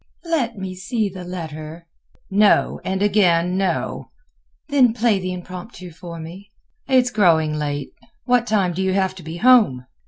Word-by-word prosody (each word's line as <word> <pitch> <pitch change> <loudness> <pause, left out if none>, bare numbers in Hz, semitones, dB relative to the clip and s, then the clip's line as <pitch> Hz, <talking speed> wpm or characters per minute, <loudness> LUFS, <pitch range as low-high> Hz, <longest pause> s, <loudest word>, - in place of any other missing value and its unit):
"Let 280 -10 -1
me 190 -1 -5
see 200 +4 -2
the 185 -1 -9
letter." 165 -2 -7 0.5
"No, 205 +1 +3
and 190 +1 -1
again, 180 -4 +2
no." 190 -2 -2 0.6
"Then 260 -6 +3
play 225 -4 +2
the 185 0 -4
Impromptu 180 +1 -8
for 170 0 -9
me." 180 +5 -10 0.4
"It 265 - +1
is 250 -1 +2
growing 165 -8 +3
late; 145 -2 -3 0.3
what 245 -1 +2
time 195 -5 +1
do 185 - -3
you 190 0 0
have 190 -1 +1
to - - -9
be 165 +1 -7
home?" 215 - +4
185 Hz, 160 wpm, -21 LUFS, 170-215 Hz, 0.6 s, home